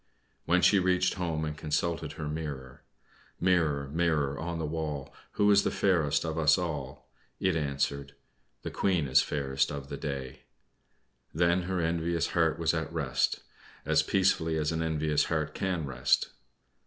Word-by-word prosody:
When 90 +2 +2
she 100 - +6
reached 90 0 +2
home 80 -4 -2
and 75 -1 -4
consulted 80 0 -2
her 75 -1 -5
mirror 75 -4 -6 0.6
"Mirror, 80 -6 +1
mirror 75 -5 +1
on 85 +2 -3
the 80 - -2
wall, 75 -3 -4 0.2
Who 105 0 +3
is 100 0 +6
the - - 0
fairest 85 -6 +1
of 80 0 -2
us 75 +1 +5
all?" 70 -7 -5 0.3
it 95 -3 +1
answered: 70 -2 -2 0.5
"The - - -4
Queen 90 -7 +1
is 65 - +5
fairest 70 -2 -1
of 70 -1 -6
the - - -5
day." 65 -2 -5 1.0
Then 85 +2 +3
her 95 -1 0
envious 85 0 0
heart - - +1
was - - +1
at - - -2
rest, - - 0 0.4
as - - +3
peacefully 80 -4 +1
as 75 0 0
an 80 0 -1
envious 75 -2 +1
heart 75 -2 -2
can 90 -5 -2
rest. 65 -2 +1
80 Hz, 155 wpm, -29 LUFS, 70-85 Hz, 1.0 s, she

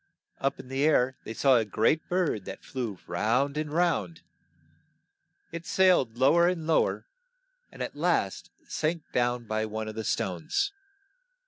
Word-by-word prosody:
Up 135 - -1
in - - -10
the 135 +2 -1
air 130 -4 +3
they 110 - -5
saw 135 0 +5
a 115 - +2
great 110 +9 +1
bird 175 - 0
that - - -8
flew 120 -7 -4
round 125 +7 0
and 150 -1 -3
round. 170 +1 0 1.3
It 170 0 -7
sailed 180 -12 +3
low 140 +6 +5
er 170 - +5
and 175 -3 -1
low 160 0 +3
er, - - -5 0.7
and - - -5
at - - -6
last - - 0 0.2
sank 160 +1 -1
down 120 -1 0
by 110 0 -1
one 110 0 -4
of 110 - -5
the 110 0 -4
stones. 95 - -1
135 Hz, 160 wpm, -28 LUFS, 110-165 Hz, 1.3 s, saw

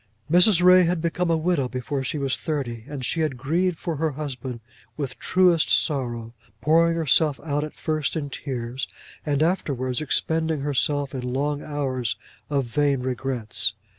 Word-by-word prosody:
Mrs. 180 +1 +6
Ray 180 0 +7
had 175 0 +1
become 170 +2 -1
a 165 - +3
widow 160 -5 +1
before 135 +2 -3
she 140 - -3
was 135 -2 0
thirty; 125 -8 -3
and 140 -4 -5
she 165 - -1
had 155 -5 0
grieved 165 +7 0
for 165 -1 -3
her 155 0 0
husband 130 -4 -5 0.4
with 135 -4 -4
truest 180 -3 +3
sorrow, 120 -6 0 0.3
pouring 165 +2 +4
herself 155 -2 +2
out 145 -1 -1
at 155 - -7
first 155 -1 -1
in 145 -3 -3
tears, 130 -2 -4 0.4
and 145 0 +2
afterwards 135 -7 0
expending 160 +1 0
herself 145 0 0
in 130 - -3
long 140 +4 -1
hours 130 -6 -2 0.3
of 140 -3 +1
vain 140 +2 +1
regrets. 125 -5 -1
145 Hz, 160 wpm, -24 LUFS, 130-160 Hz, 0.4 s, Ray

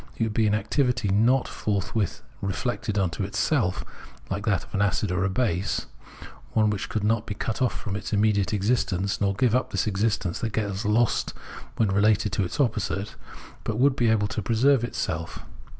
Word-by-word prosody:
would 110 -2 0
be 110 0 +2
an 105 - +2
activity 120 +1 0
not 115 +7 +3
forthwith 105 -1 -2 0.2
reflected 105 +2 -2
into 95 0 0
itself, 100 - 0 0.5
like 100 +3 -3
that 100 -5 +2
of - - -17
an 100 - +1
acid 100 0 +1
or 90 0 0
a 95 - +1
base 95 -3 0 0.3
— - - -16
one 110 -1 +4
which 105 -1 -3
could 110 - -2
not 110 +1 +1
be 105 - -4
cut 110 - -3
off 125 - +1
from 100 -3 -4
its 100 - -4
imme 105 0 +3
diate 100 -3 0
existence, 100 -3 0
nor 100 -1 +2
give 115 +2 +2
up 130 +1 +1
this 95 - 0
existence 105 -4 0
that 115 -2 -3
gets 100 -2 -2
lost 110 +2 +1 0.4
when 110 -3 +2
related 105 +1 +3
to 100 - 0
its 90 - -5
opposite, 105 -5 0 0.5
but 110 - -2
would 135 +2 +4
be 120 -4 +2
able 105 -2 +2
to 110 - -3
pre 115 +4 -1
serve 135 +1 +4
itself. 85 -8 -3
105 Hz, 195 wpm, -26 LUFS, 100-115 Hz, 0.5 s, one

